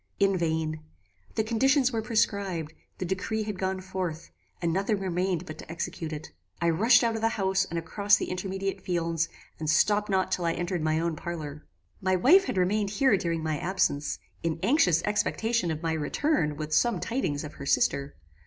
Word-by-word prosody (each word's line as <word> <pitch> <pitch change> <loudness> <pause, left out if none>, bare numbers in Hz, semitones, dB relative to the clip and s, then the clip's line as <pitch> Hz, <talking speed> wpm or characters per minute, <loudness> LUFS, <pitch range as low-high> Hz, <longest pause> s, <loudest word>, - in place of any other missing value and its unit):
"In 195 -1 +4
vain. 160 -2 -1 0.6
The 220 - +2
conditions 260 +4 +3
were 225 -2 -1
prescribed; 200 -8 0 0.2
the 185 - -3
decree 190 +4 -2
had 210 -3 -5
gone 190 0 -1
forth, 180 -3 -4 0.3
and 170 -1 0
nothing 200 +3 0
remained 180 -1 -1
but 155 -2 -8
to - - -9
execute 170 -1 -4
it. 155 0 -7 0.3
I 170 0 +2
rushed 220 +10 +5
out 230 -1 +2
of 225 - -3
the 225 - +3
house 190 -1 +2
and 170 - -5
across 200 +5 +3
the - - -4
intermediate 195 +1 -3
fields, 170 -2 -1 0.3
and 155 -1 -2
stopped 210 +6 +3
not 190 -1 +1
till 180 -2 0
I 165 - +2
entered 175 0 -2
my 155 0 +1
own 165 -1 -1
parlour. 155 -3 -6 0.3
"My 185 -1 +2
wife 335 - +6
had 195 - -3
remained 200 +3 +2
here 260 +2 +3
during 165 -3 -1
my 155 -2 -1
absence, 170 -5 0 0.2
in 165 -1 -1
anxious 180 - +4
expectation 215 -1 0
of 160 0 -3
my 165 -1 0
return 160 - 0
with 155 +1 -4
some 225 +4 +3
tidings 170 - -2
of 150 0 -7
her 140 - -5
sister. 140 0 +1
185 Hz, 190 wpm, -28 LUFS, 160-205 Hz, 0.6 s, wife